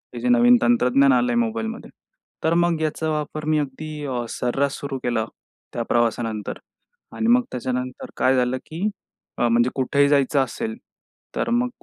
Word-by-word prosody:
हे - - -4
जे 250 - 0
नवीन 245 0 +6
तंत्रज्ञान 275 +3 +4
आलंय 245 -2 +2
मोबाईलमध्ये. 225 0 -2 0.5
तर 160 - +2
मग 170 -1 +2
याचा 155 0 -1
वापर 150 0 -3
मी 155 0 +2
अगदी 150 +2 -5
अ, 125 -3 -2
सर्रास 135 +4 -1
सुरू 140 -1 -4
केला 120 -2 0 0.5
त्या 120 - -2
प्रवासानंतर. 115 -2 0 0.6
आणि 225 - -1
मग 245 +1 +6
त्याच्यानंतर 125 0 -4
काय 130 +1 +3
झालं 125 0 +1
की 170 +7 -3 0.5
अ, 120 - +2
म्हणजे 120 +1 +3
कुठेही 140 +2 +2
जायचं 140 0 +3
असेल. 225 - -4 0.6
तर - - -1
मग 245 +1 +1
150 Hz, 155 wpm, -23 LUFS, -, 0.6 s, नवीन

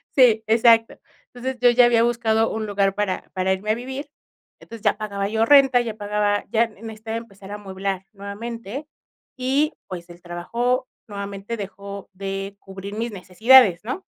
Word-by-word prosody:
Sí, 230 -5 +5
exacto. 225 0 +4 0.4
Entonces, 255 +1 -4
yo 245 - +7
ya 240 +1 +6
había 235 -1 +4
buscado 225 -2 +2
un 220 0 -3
lugar 200 -2 +1
para 205 -2 -2
para 185 0 0
irme 200 +3 -2
a - - +2
vivir. 265 +5 -6 0.5
Entonces, 230 -2 -11
ya 210 -1 +2
pagaba 200 -2 -3
yo 220 +1 +2
renta, 270 -2 +6
ya 225 -3 -4
pagaba 205 -1 0
ya 230 +1 +3
necesitaba 220 +1 -7
empezar 200 -4 -11
a - - -4
amueblar 195 -1 -4
nuevamente 230 +6 -7 0.5
y, 275 +5 +1
pues, 175 -1 -8
el 175 0 -13
trabajo 235 +9 -1 0.2
nuevamente 200 +1 -5
dejó 200 -1 -8
de 195 +1 -5
cubrir 195 +1 -9
mis 230 +2 -3
necesidades, 205 +1 +5
¿no? 260 +11 -4
215 Hz, 160 wpm, -23 LUFS, 200-235 Hz, 0.5 s, yo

